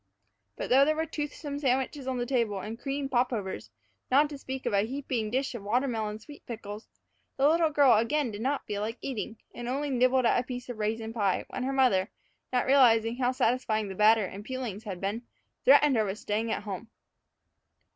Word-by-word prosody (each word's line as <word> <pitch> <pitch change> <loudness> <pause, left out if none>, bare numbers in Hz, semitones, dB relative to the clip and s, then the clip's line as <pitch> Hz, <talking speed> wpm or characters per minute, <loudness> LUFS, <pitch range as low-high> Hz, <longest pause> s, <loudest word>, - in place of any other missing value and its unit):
But - - -5
though 265 +2 +7
there 310 +2 +2
were 320 +1 -1
toothsome 295 -1 -5
sandwiches 265 0 -1
on 260 -1 -1
the 245 - -1
table 230 -6 0
and 220 +4 -6
cream 275 0 -3
popovers, 240 -7 -1 0.4
not 290 +3 +4
to 290 - -6
speak 265 -1 -6
of - - -1
a 200 - +4
heaping 245 -1 -2
dish 265 +4 -1
of 235 - -6
watermelon 220 -1 -1
sweet 290 +7 -14
pickles, 215 -2 -7 0.5
the 275 +1 +4
little 325 +1 +3
girl 285 -3 +5
again 235 +4 +1
did 205 +1 -7
not 275 +4 -1
feel 205 -1 -3
like 225 +3 -3
eating, 230 -3 -4 0.2
and 240 0 -6
only 280 +2 -1
nibbled 255 0 +3
at 235 - +4
a - - -1
piece 250 -1 -6
of 240 -3 -6
raisin 220 +1 -2
pie 200 -5 0
when 260 - -4
her 260 +2 -1
mother, 245 -8 +3 0.4
not 250 -1 +1
realizing 240 -4 +4
how 250 -1 +1
satisfying 245 -5 0
the - - -5
batter 215 +2 +4
and 195 +2 -8
peelings 235 -4 -5
had 190 -4 -5
been, 200 +5 -2 0.4
threatened 295 - +6
her 220 - +3
with 195 +1 -3
staying 220 +2 -2
at - - -2
home. 205 +2 -6
245 Hz, 200 wpm, -29 LUFS, 215-270 Hz, 0.5 s, though